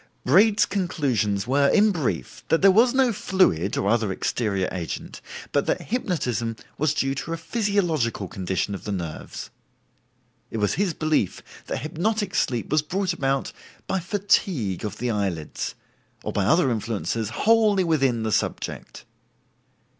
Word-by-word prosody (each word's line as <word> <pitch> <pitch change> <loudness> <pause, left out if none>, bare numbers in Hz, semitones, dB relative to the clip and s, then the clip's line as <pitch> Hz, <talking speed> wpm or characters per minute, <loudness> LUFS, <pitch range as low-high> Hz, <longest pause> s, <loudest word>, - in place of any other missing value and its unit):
Braid's 200 - +5
conclusions 125 - 0
were, 140 +3 +3
in 210 +7 +4
brief, 160 - -3
that 165 - +2
there 195 - +8
was 230 +6 +5
no 260 -2 +3
fluid, 185 - +1
or 100 - 0
other 110 -2 +2
exterior 100 -1 -1
agent, 85 -3 -5 0.3
but - - +1
that - - -1
hypnotism 125 - -1 0.2
was 155 +1 +1
due 135 -1 +1
to 150 +4 -4
a - - -2
physiological 165 - 0
condition 95 +2 -2
of 100 - -6
the 105 - -3
nerves. 85 -5 -6 1.0
It - - -5
was 105 -2 +1
his 190 -4 0
belief 155 - 0 0.2
that - - -3
hypnotic 195 +6 -1
sleep 120 -3 0
was 155 0 +4
brought 185 +5 -1
about 135 0 -1 0.3
by 190 - -1
fatigue 175 - 0
of 105 - -4
the 120 0 -1
eyelids, 95 -7 -3 0.5
or - - -4
by 100 - +1
other 145 - +4
influences 110 -1 -2
wholly 215 - +3
within 135 -9 +1
the 110 - -1
subject. - - -3
140 Hz, 145 wpm, -24 LUFS, -, 1.0 s, there